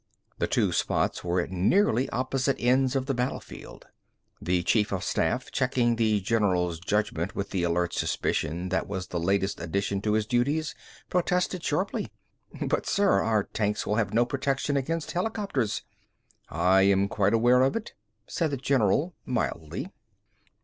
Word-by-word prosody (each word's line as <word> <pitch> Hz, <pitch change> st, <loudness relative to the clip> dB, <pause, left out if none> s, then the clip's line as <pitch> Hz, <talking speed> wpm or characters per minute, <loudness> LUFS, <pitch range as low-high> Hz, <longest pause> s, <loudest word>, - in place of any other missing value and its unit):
The -, -, +1 dB
two -, -, +1 dB
spots -, -, 0 dB
were 90 Hz, +1 st, 0 dB
at 85 Hz, -, -6 dB
nearly 120 Hz, -, +2 dB
opposite 130 Hz, +1 st, 0 dB
ends 130 Hz, +2 st, +2 dB
of 130 Hz, -1 st, 0 dB
the 135 Hz, -, -1 dB
battle 125 Hz, +1 st, -1 dB
field. -, -, -12 dB, 0.6 s
The 90 Hz, 0 st, 0 dB
chief 105 Hz, +3 st, +2 dB
of 95 Hz, -2 st, -2 dB
staff, -, -, -1 dB
checking 120 Hz, -2 st, +1 dB
the 110 Hz, -2 st, +2 dB
general's 95 Hz, -6 st, +1 dB
judgment 100 Hz, -2 st, -1 dB
with 100 Hz, -, -4 dB
the 95 Hz, -, -1 dB
alert 85 Hz, 0 st, 0 dB
suspicion 85 Hz, +3 st, -1 dB
that 95 Hz, -, -1 dB
was 95 Hz, -2 st, -4 dB
the 85 Hz, -, -2 dB
latest 95 Hz, +3 st, 0 dB
addition 100 Hz, +3 st, -1 dB
to 105 Hz, 0 st, 0 dB
his 110 Hz, -1 st, +1 dB
duties, 140 Hz, +7 st, 0 dB, 0.4 s
protested 180 Hz, 0 st, 0 dB
sharply. -, -, -1 dB, 0.5 s
"But -, -, -1 dB
sir, 200 Hz, 0 st, +3 dB
our 110 Hz, -2 st, +1 dB
tanks 105 Hz, 0 st, -2 dB
will 105 Hz, -, 0 dB
have 105 Hz, -3 st, 0 dB
no 115 Hz, +2 st, +3 dB
protection 135 Hz, +2 st, -1 dB
against 155 Hz, +4 st, -2 dB
helicopters!" 180 Hz, -, -1 dB, 0.7 s
"I 90 Hz, +4 st, +3 dB
am 100 Hz, 0 st, +4 dB
quite 100 Hz, +2 st, +1 dB
aware 120 Hz, +2 st, +4 dB
of 135 Hz, +1 st, +2 dB
it," 230 Hz, -, -4 dB, 0.3 s
said 165 Hz, +6 st, -1 dB
the 140 Hz, -, -2 dB
general 135 Hz, -, +1 dB
mildly. 85 Hz, -, -3 dB
110 Hz, 155 wpm, -27 LUFS, 95-135 Hz, 0.7 s, am